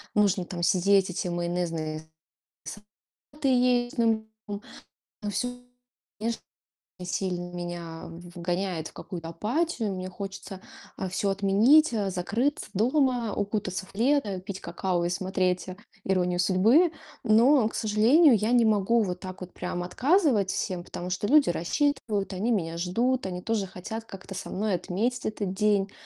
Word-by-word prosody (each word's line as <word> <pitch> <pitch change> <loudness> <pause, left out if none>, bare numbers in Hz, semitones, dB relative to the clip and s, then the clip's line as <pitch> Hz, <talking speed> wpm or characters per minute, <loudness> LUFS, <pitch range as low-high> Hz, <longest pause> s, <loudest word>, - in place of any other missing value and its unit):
нужно 200 -3 +3
там 175 0 -5
сидеть, 195 +1 +4
эти 180 +1 -3
майонезные 170 -3 -2 1.2
салаты 285 -1 -1
есть. 245 -1 +2
Ну, 225 -2 +2 0.2
м, 205 0 -4 0.6
но 210 - -3
всё, 245 +4 -1 0.7
конечно, 230 +1 -2 0.6
сильно 180 -1 -3
меня 175 -2 -6 0.3
вгоняет 175 -1 -2
в - - -21
какую-то 170 -3 -7
апатию. 225 - -1
Мне 185 0 -5
хочется, 195 0 -7 0.4
а, 190 - -3
всё 195 +2 -1
отменить, 210 +11 +4 0.2
закрыться 210 +10 -1
дома, 245 +1 +1
укутаться 195 -2 -2
в - - -18
плед, 265 +6 +2 0.2
пить 195 -1 -5
какао 175 0 -1
и - - 0
смотреть 185 0 -1 0.4
"Иронию 180 -2 +1
судьбы". 220 - +4 0.3
Но, 235 +2 +5
к - - -9
сожалению, 235 +8 +5
я 215 +2 0
не 240 -2 +5
могу 220 +2 +3
вот 180 -2 -3
так 185 0 -8
вот 185 0 -8
прям 180 -1 -4
отказывать 255 - +2
всем, 180 -2 -2
потому 180 0 -6
что 185 +3 -1
люди 295 -1 +5
рассчитывают, 215 - -1
они 195 +6 -1
меня 165 -6 -1
ждут, 235 +8 0
они 180 -1 -5
тоже 220 -4 -1
хотят 210 +5 -7
как-то 195 -2 -10
со - - -6
мной 205 +1 -1
отметить 215 +8 -2
этот 205 -3 -3
день. 205 -1 +2
195 Hz, 145 wpm, -27 LUFS, 180-230 Hz, 1.2 s, Но